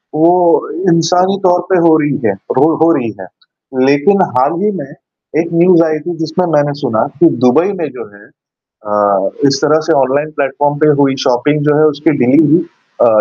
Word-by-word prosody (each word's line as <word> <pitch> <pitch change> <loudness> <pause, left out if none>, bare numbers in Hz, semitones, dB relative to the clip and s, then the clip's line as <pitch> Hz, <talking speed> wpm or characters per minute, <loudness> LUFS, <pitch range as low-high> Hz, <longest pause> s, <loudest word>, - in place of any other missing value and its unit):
वो 175 - +2 0.2
इंसानी 180 +4 +1
तौर 180 -1 +2
पे 185 - +2
हो 160 - +4
रही 145 -2 -2
है, 100 - +1
रो 150 +10 -1
हो 165 - +4
रही 120 -6 -3
है। 95 - -10 0.6
लेकिन 165 +8 +2 0.2
हाल 130 - +1
ही 210 +1 0
में 140 +1 -9 0.5
एक 170 +1 -2
न्यूज़ 170 0 +4
आई 155 -1 -2
थी 175 +3 -6
जिसमें 160 +3 -2
मैंने 145 -1 +1
सुना 115 -5 -1
कि 170 - +5 0.2
दुबई 160 +10 +2
में 155 - -2
जो 130 - -9
है 100 - -18 0.6
अ, 100 -2 0 0.2
इस 135 0 +1
तरह 155 +1 +2
से 165 - +1
ऑनलाइन 140 +3 -1
प्लेटफॉर्म 145 +1 -1
पे 155 - +2
हुई 135 -1 +2
शॉपिंग 145 +6 0
जो 150 -1 +2
है 155 - +3
उसकी 145 +3 -1
डिलीवरी 150 +6 +3 0.4
अ, - - +5
150 Hz, 185 wpm, -13 LUFS, 135-170 Hz, 0.6 s, कि